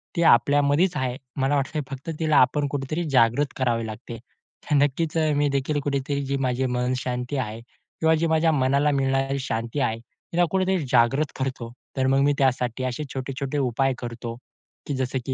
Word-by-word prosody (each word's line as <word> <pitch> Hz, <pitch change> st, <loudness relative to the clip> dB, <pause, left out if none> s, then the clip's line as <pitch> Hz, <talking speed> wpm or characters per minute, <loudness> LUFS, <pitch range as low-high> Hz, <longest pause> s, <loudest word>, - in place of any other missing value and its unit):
ती 170 Hz, -, 0 dB
आपल्यामध्येच 145 Hz, +6 st, +4 dB
आहे. 125 Hz, -1 st, -1 dB, 0.2 s
मला 135 Hz, +1 st, +1 dB
वाटतं 145 Hz, +3 st, -1 dB
फक्त 135 Hz, +3 st, -7 dB
तिला 155 Hz, -2 st, +2 dB
आपण 145 Hz, +3 st, +3 dB
कुठेतरी 145 Hz, +4 st, -2 dB
जागृत 130 Hz, +2 st, +3 dB
करावे 120 Hz, -3 st, 0 dB
लागते. 115 Hz, +2 st, -8 dB
तर 125 Hz, +5 st, -7 dB
नक्कीच 145 Hz, +3 st, +1 dB
अ, 155 Hz, -1 st, +2 dB
मी 145 Hz, 0 st, +2 dB
देखील 140 Hz, +2 st, 0 dB
कुठेतरी 140 Hz, 0 st, -1 dB
जी 140 Hz, +1 st, -1 dB
माझे 125 Hz, +1 st, 0 dB
मनशांती 125 Hz, +1 st, -2 dB
आहे 110 Hz, -4 st, -3 dB
किंवा 160 Hz, +6 st, -2 dB
जी 165 Hz, +1 st, 0 dB
माझ्या 160 Hz, 0 st, +3 dB
मनाला 140 Hz, +1 st, +2 dB
मिळणारी 135 Hz, 0 st, 0 dB
शांती 115 Hz, +1 st, -3 dB
आहे, 115 Hz, -4 st, 0 dB
तिला 125 Hz, +9 st, -2 dB
कुठेतरी 190 Hz, 0 st, +1 dB
जागृत 135 Hz, +5 st, +3 dB
करतो. 130 Hz, -3 st, -3 dB, 0.3 s
तर 130 Hz, 0 st, +2 dB
मग 135 Hz, +1 st, +3 dB
मी 145 Hz, +1 st, +3 dB
त्यासाठी 130 Hz, -2 st, 0 dB
असे 130 Hz, +3 st, -2 dB
छोटे-छोटे 135 Hz, +1 st, -4 dB
उपाय 135 Hz, 0 st, +1 dB
करतो 120 Hz, -1 st, -6 dB, 0.5 s
की 145 Hz, -, -2 dB
जसं 130 Hz, 0 st, -1 dB
की 130 Hz, -, -2 dB
135 Hz, 170 wpm, -24 LUFS, 125-145 Hz, 0.5 s, आपल्यामध्येच